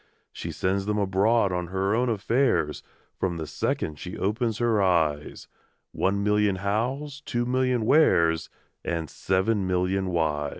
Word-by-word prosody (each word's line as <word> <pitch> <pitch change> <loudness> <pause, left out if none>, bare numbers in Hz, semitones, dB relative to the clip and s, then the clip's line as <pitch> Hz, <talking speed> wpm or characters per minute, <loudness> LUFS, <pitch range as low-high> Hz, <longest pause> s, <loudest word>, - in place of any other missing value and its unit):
She - - -6
sends 95 +2 -1
'em 105 - 0
abroad 100 +2 +2
on 90 -1 -2
her 95 +3 -1
own 125 +2 +1
affairs, 115 - +1 0.4
From 90 -3 -1
the 80 - -4
second 75 0 -3
she 90 - -7
opens 110 +2 -1
her 115 -3 +2
eyes 80 -6 0 0.4
One 100 +2 0
million 105 -1 +2
Hows, 125 +9 -2
two 120 -3 -2
million 125 -2 +1
Wheres, 85 - +3 0.3
And 80 -3 -3
seven 95 +1 0
million 95 +1 0
Whys! 80 -4 0
100 Hz, 140 wpm, -26 LUFS, 90-115 Hz, 0.4 s, Wheres